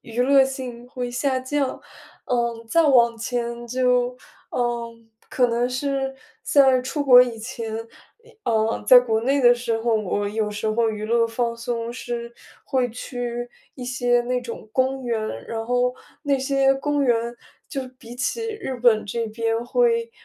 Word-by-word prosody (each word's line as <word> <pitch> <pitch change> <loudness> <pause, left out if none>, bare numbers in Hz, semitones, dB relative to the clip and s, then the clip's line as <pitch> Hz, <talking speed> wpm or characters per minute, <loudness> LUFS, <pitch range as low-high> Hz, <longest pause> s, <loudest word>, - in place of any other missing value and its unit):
娱 230 +1 -4
乐 270 +1 +5
性 255 -3 -6
会 250 -1 -4
下 260 +1 0
降。 275 +1 -2 0.5
嗯， 235 -2 -1
再 335 +7 +4
往 235 -5 +4
前 235 0 -3
就， 250 0 +1 0.3
嗯， 235 -2 -3 0.2
可 250 -1 +3
能 240 +1 0
是， 270 +1 -2 0.3
在 265 -3 +4
出 290 +3 -2
国 250 -2 +9
以 240 -2 -4
前， 225 -1 -5 0.5
一 470 0 -20
嗯， 220 -1 +1
在 250 +3 +10
国 225 -3 0
内 275 +3 +2
的 240 0 +7
时 235 -2 -2
候， 230 0 +1
我 205 -1 -1
有 215 0 -1
时 210 +1 -4
候 225 +1 +2
娱 215 0 -5
乐 230 0 +3
放 235 +1 -2
松 235 -1 -3
是， 240 -1 -5 0.3
会 255 -2 0
去 240 0 -5 0.3
一 250 - -7
些 245 -1 +1
那 250 +1 -1
种 230 -2 -8
公 260 +2 0
园， 235 -2 -1 0.3
然 225 -1 -4
后 250 +1 +1 0.3
那 280 -2 +1
些 270 0 +3
公 290 +1 0
园 235 -1 +1 0.3
就 275 - -3 0.2
比 235 -1 -11
起 455 - -2
日 425 -12 -5
本 235 -3 +3
这 230 +3 -3
边 225 +1 -1
会， 465 - +2
245 Hz, 175 characters per minute, -23 LUFS, 230-260 Hz, 0.5 s, 在